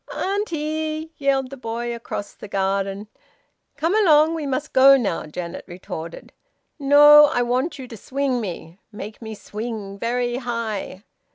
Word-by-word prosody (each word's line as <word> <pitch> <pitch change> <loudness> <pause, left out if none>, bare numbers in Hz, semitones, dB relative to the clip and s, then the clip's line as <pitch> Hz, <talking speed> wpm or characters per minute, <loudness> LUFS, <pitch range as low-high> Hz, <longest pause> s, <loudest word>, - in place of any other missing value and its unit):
"Auntie!" 315 -5 -2
yelled 270 -2 0
the 275 - -8
boy 235 0 -4
across 215 -3 -6
the - - -11
garden. 195 +1 -1 0.7
"Come 330 +4 0
along, 320 -6 +5
we 315 -3 -3
must 280 +3 -3
go 270 +1 +7
now," 200 -11 -2
Janet 170 +2 -6
retorted. 170 -2 -8 0.5
"No! 295 +1 +8
I 245 -4 0
want 255 +6 -1
you 260 -2 -8
to 235 - -10
swing 265 +2 -2
me. 175 -3 -7
Make 210 +1 -9
me 220 -1 -7
swing 210 -2 -7
very 240 +1 -1
high." 230 -6 -4
245 Hz, 145 wpm, -22 LUFS, 205-295 Hz, 0.7 s, No